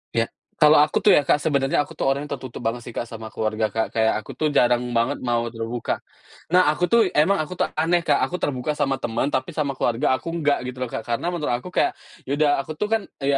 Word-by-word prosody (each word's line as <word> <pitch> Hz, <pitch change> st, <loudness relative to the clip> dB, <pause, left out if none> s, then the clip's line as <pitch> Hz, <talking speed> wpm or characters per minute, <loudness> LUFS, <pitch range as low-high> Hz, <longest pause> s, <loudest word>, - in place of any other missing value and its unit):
Iya, 115 Hz, -, +3 dB, 0.4 s
kalau 150 Hz, 0 st, +7 dB
aku 150 Hz, -, 0 dB
tuh 205 Hz, -, +8 dB
ya, -, -, +5 dB
Kak, -, -, +4 dB
sebenarnya 140 Hz, -3 st, +1 dB
aku -, -, -12 dB
tuh -, -, -1 dB
orangnya 140 Hz, +2 st, -1 dB
tertutup 130 Hz, -3 st, -7 dB
banget 115 Hz, +2 st, -1 dB
sih, 120 Hz, -, -8 dB
Kak, 120 Hz, -, -1 dB
sama 110 Hz, -1 st, -7 dB
keluarga, 110 Hz, 0 st, -1 dB
Kak, 110 Hz, 0 st, +1 dB
kayak 110 Hz, 0 st, +2 dB
aku -, -, -10 dB
tuh 155 Hz, -, +2 dB
jarang 120 Hz, 0 st, +4 dB, 0.2 s
banget 115 Hz, +2 st, +1 dB
mau 120 Hz, -1 st, +1 dB
terbuka. 115 Hz, +1 st, -3 dB, 0.6 s
Nah, 185 Hz, -, +7 dB
aku 175 Hz, -, -4 dB
tuh 235 Hz, -, +6 dB, 0.2 s
emang 195 Hz, +6 st, +4 dB
aku 180 Hz, +4 st, -7 dB
tuh -, -, +2 dB
aneh, 170 Hz, +2 st, +2 dB
Kak, -, -, +4 dB
aku 180 Hz, -, -5 dB
terbuka 135 Hz, +1 st, -1 dB
sama 135 Hz, -2 st, +1 dB
teman 115 Hz, +4 st, 0 dB
tapi 130 Hz, +3 st, -1 dB
sama 150 Hz, -3 st, -1 dB
keluarga 120 Hz, -1 st, 0 dB
aku 125 Hz, -, -13 dB
enggak, 150 Hz, -3 st, +2 dB
gitu 125 Hz, 0 st, -6 dB
loh, 130 Hz, -, -2 dB
Kak. 110 Hz, -, -3 dB
Karena 115 Hz, +6 st, -1 dB
menurut 150 Hz, -7 st, -1 dB
aku 180 Hz, -, -8 dB
kayak, -, -, +3 dB, 0.3 s
ya -, -, -6 dB
udah 155 Hz, -1 st, +3 dB
aku 140 Hz, -, -9 dB
tuh 210 Hz, -, 0 dB
kan, 225 Hz, -, +2 dB, 0.2 s
eee, 140 Hz, 0 st, +2 dB
135 Hz, 240 wpm, -23 LUFS, 115-155 Hz, 0.6 s, tuh